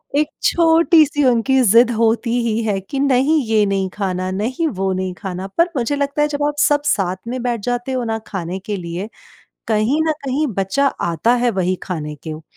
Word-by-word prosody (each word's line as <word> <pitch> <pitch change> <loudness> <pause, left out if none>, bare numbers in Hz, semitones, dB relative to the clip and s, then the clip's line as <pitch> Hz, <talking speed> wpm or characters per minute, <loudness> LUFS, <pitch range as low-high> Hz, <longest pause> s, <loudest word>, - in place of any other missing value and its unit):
एक 300 +1 +2 0.2
छोटी-सी 325 -3 +4
उनकी 255 +2 +3
ज़िद 235 +1 +5
होती 230 +1 +1
ही 225 0 0
है 205 -3 0
कि 195 +9 -6
नहीं 280 +3 +3
ये 220 -2 +3
नहीं 195 -1 -1
खाना, 185 -2 -2
नहीं 240 - -1
वो 195 -8 -2
नहीं 185 0 -3
खाना 185 +2 -6
पर 335 +1 +4
मुझे 250 +3 0
लगता 280 +1 -1
है 295 - +3
जब 290 -1 -3
आप 295 - -2
सब 290 -1 +3
साथ 190 -9 +1
में 250 +1 -3
बैठ 240 -2 -1
जाते 245 +3 -2
हो 255 -1 -1
ना 225 -1 -2
खाने 185 -1 -4
के 205 +2 -4
लिए, 175 +3 -5 0.6
कहीं 220 +7 +1
न - - +3
कहीं 275 +3 0
बच्चा 195 +9 0
आता 170 +7 +1
है 245 0 +1
वहीं 185 0 0
खाने 150 -5 -5
को। 155 0 -6
230 Hz, 195 wpm, -19 LUFS, 190-280 Hz, 0.6 s, ज़िद